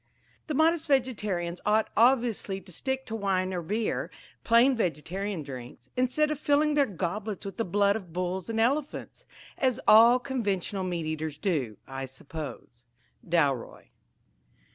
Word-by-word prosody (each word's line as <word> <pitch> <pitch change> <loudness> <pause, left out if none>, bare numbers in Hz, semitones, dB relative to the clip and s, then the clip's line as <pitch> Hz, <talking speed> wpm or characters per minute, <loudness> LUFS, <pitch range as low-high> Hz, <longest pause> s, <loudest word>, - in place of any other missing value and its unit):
The 305 - -2
modest 325 +2 +3
vegetarians 210 - 0
ought 215 +1 +2
obviously 230 -5 +2
to 190 - -13
stick 265 +9 -2
to 225 - -5
wine 190 -3 0
or 180 - -2
beer, 210 +6 -2 0.3
plain 235 +3 +5
vegetarian 185 - -2
drinks, 125 -3 -10
instead 255 +5 +1
of 300 - -3
filling 295 +1 +2
their 285 -2 +3
goblets 200 +3 -4
with 195 - -6
the 230 - 0
blood 200 +2 +2
of 190 -6 -7
bulls 180 +2 -3
and 225 0 -1
elephants, 275 +6 -1 0.3
as 255 -2 +1
all 230 +3 +8
conventional 205 -7 -2
meat 175 -3 -2
eaters 155 -1 -3
do, 140 - -1
I 135 0 -5
suppose." 135 -3 -9 0.4
Dalroy. 145 -8 0
200 Hz, 140 wpm, -28 LUFS, 170-250 Hz, 0.4 s, all